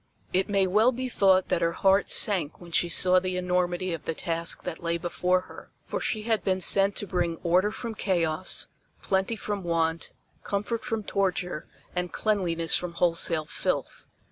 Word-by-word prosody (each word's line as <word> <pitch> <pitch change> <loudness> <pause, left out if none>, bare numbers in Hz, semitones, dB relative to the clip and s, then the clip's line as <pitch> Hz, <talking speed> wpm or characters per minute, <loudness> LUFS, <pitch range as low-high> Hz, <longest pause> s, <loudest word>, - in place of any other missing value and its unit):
It 190 +3 +1
may 195 -1 +2
well 215 +6 +4
be 255 +1 -4
thought 190 -6 +3
that - - +1
her 170 0 +1
heart 195 +3 +2
sank 175 -8 +2
when 175 -1 -12
she 170 +1 +2
saw 185 +1 +5
the 185 0 -3
enormity 180 0 -1
of 165 - -6
the 165 - -2
task 165 0 0
that 160 - -5
lay 170 0 -1
before 180 +2 0
her, - - -13 0.2
for - - -4
she 215 -2 -2
had 225 -1 0
been 185 -1 0
sent 195 +2 +4
to - - -4
bring 175 -3 -1
order 180 +4 +3
from 230 +1 -6
chaos, 175 -4 0 0.4
plenty 190 +4 0
from 205 -1 -4
want, 165 -1 -1 0.3
comfort 210 +3 -3
from 225 -3 -3
torture 185 -5 -2 0.3
and 180 -1 -2
cleanliness 175 -6 0
from 180 -1 -3
wholesale 165 -2 +2
filth. - - -3
185 Hz, 175 wpm, -27 LUFS, 170-200 Hz, 0.4 s, saw